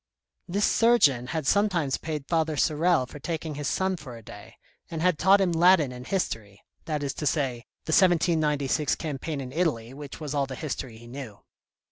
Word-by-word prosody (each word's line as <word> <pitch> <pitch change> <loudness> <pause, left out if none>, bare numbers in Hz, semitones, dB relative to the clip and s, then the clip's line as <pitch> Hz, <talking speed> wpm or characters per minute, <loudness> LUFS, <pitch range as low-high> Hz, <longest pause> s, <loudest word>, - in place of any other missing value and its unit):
This 200 +3 +1
Surgeon 150 - +4
had 155 +1 -3
sometimes 175 -6 +2
paid 155 -3 -4
Father 160 -2 0
Sorel 155 -1 +2
for 145 - -11
taking 160 0 -4
his 145 -1 -4
son 190 -1 0
for 130 -7 -9
a 115 - -13
day, - - -12 0.3
and 165 - -4
had 180 -1 +2
taught 195 +2 +5
him 190 -3 +2
Latin 170 -4 +4
and 125 +1 -9
History, 110 - -3 0.2
that 150 -2 -2
is 140 - -2
to 150 - -3
say 130 -4 -1 0.2
the - - -3
1796 155 -5 +2
Campaign 150 -1 -4
in 130 -2 -6
Italy 135 -7 -1
which 145 0 -9
was 150 -2 -5
all 140 -2 0
the 130 - -6
history 130 -5 -5
he 120 - -14
knew. 120 -4 -9
150 Hz, 185 wpm, -26 LUFS, 135-170 Hz, 0.3 s, taught